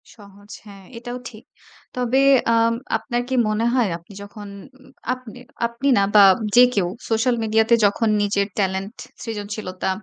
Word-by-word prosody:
সহজ। 205 -1 -17
হ্যাঁ, 200 -2 -13
এটাও 245 +1 -7
ঠিক। 220 -1 -15 0.5
তবে 250 +1 0 0.4
আম 230 0 +3 0.2
আপনার 240 -1 -3
কি 260 - -1
মনে 215 +2 -1
হয় 245 -4 +2
আপনি 170 +4 -17
যখন 205 0 -11 0.3
উম 265 - -19 0.2
আপনি 255 -2 -11 0.3
আপনি 235 +4 -3
না - - +4
বা, 210 - +7 0.3
যে 245 - +8
কেউ 195 -6 0 0.2
সোশ্যাল 230 +2 +1
মিডিয়াতে 220 +1 +3
যখন 215 +3 +1
নিজের 200 -1 0
টেলেন্ট, 195 +2 -2 0.3
সৃজনশীলতা 205 -4 -5
220 Hz, 150 wpm, -21 LUFS, 200-240 Hz, 0.5 s, যে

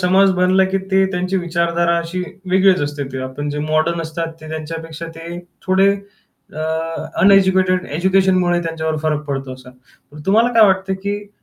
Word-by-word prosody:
समाज 190 +2 +4
बनला, 185 +1 +4
की 190 +1 -1
ते 190 0 +4
त्यांची 185 +1 -1
विचारधारा 170 -1 0
अशी 170 +2 -4 0.3
वेगळीच 190 -1 +4
असते. 145 0 -3
ते 130 - -4
आपण 130 +3 -5
जे 145 - -4
मॉडर्न 155 +3 0
असतात 165 +1 -4
ते 155 - -10
त्यांच्यापेक्षा 160 +1 -6
ते 170 +1 -7 0.3
थोडे 190 +1 +4 0.6
अ, 155 - -5 0.6
अनएज्युकेटेड 190 -2 +4
एज्युकेशनमुळे 185 -1 +2
त्यांच्यावर 160 -1 -2
फरक 155 -1 0
पडतो 135 -2 -3
असा. 130 -1 -14 0.4
पण 150 - -10
तुम्हाला 220 +5 +4
काय 225 -1 +6
वाटतं, 190 0 +1
की 205 +2 -5
175 Hz, 160 wpm, -18 LUFS, 160-190 Hz, 0.6 s, काय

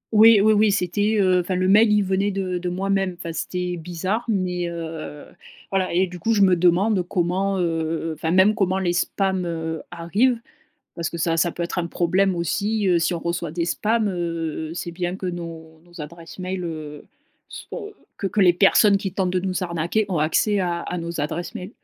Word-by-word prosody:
Oui, 220 0 +8
oui, 215 +1 +5
oui, 215 0 +4
c'était, 205 +3 +1
heu 185 -2 +4
enfin, 180 +1 -2
le 185 +1 +1
mail, 210 +2 +5
il 210 -1 +4
venait 195 +1 0
de 185 -2 -2
de 180 0 -3
moi-même, 195 0 -1
enfin 165 -2 -6
c'était 180 +1 -3
bizarre, 180 +7 -3
mais, 180 -5 -1
heu, 160 -3 -7 0.5
voilà. 190 -1 0
Et 180 +2 +3
du 180 -1 -9
coup, 225 +6 +1
je 200 - +4
me 185 -2 +5
demande 180 +4 +3
comment, 190 +2 0
heu, 165 -1 -1
enfin, 160 +1 -3
même, 190 +4 +5
comment 190 -2 0
les 180 -2 0
spams, 190 0 0
heu, 160 -1 -3
arrivent 200 +9 +1 0.6
parce 170 -2 -2
que 170 - -6
ça 165 0 +1
ça 170 +1 +2
peut 175 - -4
être 170 - -3
un 170 - -1
problème 185 +3 +1
aussi, 200 +5 0
heu, 175 -2 +4
si 165 +2 0
on 170 - -4
reçoit 170 -2 -3
des 170 0 -1
spams, 215 +4 +1
heu, 165 -3 -3
c'est 175 - -4
bien 175 +1 -3
que 190 0 -5
nos 165 -2 -7
nos 175 -1 -13
adresses 165 +4 -9
mail, 185 0 -3
heu, 155 -3 -7 0.4
soient 425 -3 -8 0.3
que 200 - -2
que 205 - 0
les 180 -2 +6
personnes 200 +2 +5
qui 190 -2 -4
tentent 185 -2 0
de 185 - 0
nous 185 0 -2
arnaquer 170 +5 -1
ont 175 -5 -1
accès 200 +7 +2
à 175 -2 -1
à 180 - -4
nos 170 -2 -4
adresses 160 +4 -4
mail. 185 +3 -6
180 Hz, 205 wpm, -23 LUFS, 170-195 Hz, 0.6 s, Oui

